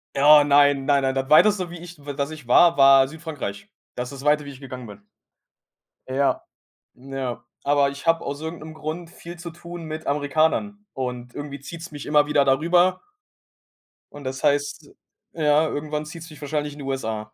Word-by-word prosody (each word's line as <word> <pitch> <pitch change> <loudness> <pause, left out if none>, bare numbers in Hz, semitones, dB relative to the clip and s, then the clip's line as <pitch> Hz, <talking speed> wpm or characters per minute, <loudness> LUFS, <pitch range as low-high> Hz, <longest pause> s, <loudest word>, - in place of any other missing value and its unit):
Ja, 150 +2 +7
nein, 145 -1 +4
nein, 140 -1 +3
nein. 135 0 0
Das 135 +1 -2
Weiteste, 185 +3 +5
wie 175 - -8
ich, 175 0 -11
w 145 - -4
dass 140 +1 -2
ich 155 -5 -10
war, 170 +7 +6
war 135 -1 +7
Südfrankreich. 150 -9 -7 0.3
Das 125 0 -4
ist 140 -1 -9
das - - -11
Weite, 150 0 +3
wie 140 - -7
ich 130 - -13
gegangen 130 -2 -8
bin. 105 -2 -12 1.0
Äh, 130 - -6
ja, 140 0 +1 0.5
ja. 130 -1 -6 0.2
Aber 140 -1 +3
ich 140 +2 -9
habe 165 0 +2
aus 140 +1 -5
irgend 160 +1 -5
'nem 155 +1 -9
Grund 160 +2 -6
viel 175 0 -11
zu 170 0 -7
tun 170 0 -9
mit 155 0 -6
Amerikanern 160 +9 0
und 125 -2 -5
irgendwie 145 -1 -7
zieht's 165 +4 -9
mich 145 -1 -8
immer 150 0 +3
wieder 145 -2 +3
da 135 0 +3
rüber 175 +3 +3 1.1
und 145 -1 -10
das 130 0 -5
heißt, 145 -1 0 0.4
ja, 155 -1 +3
irgendwann 150 0 -3
zieht's 165 +2 -9
mich 155 - -13
wahrscheinlich 150 0 -3
in 145 - -13
die 140 - -7
USA. 110 -5 -4
145 Hz, 195 wpm, -23 LUFS, 135-160 Hz, 1.1 s, Ja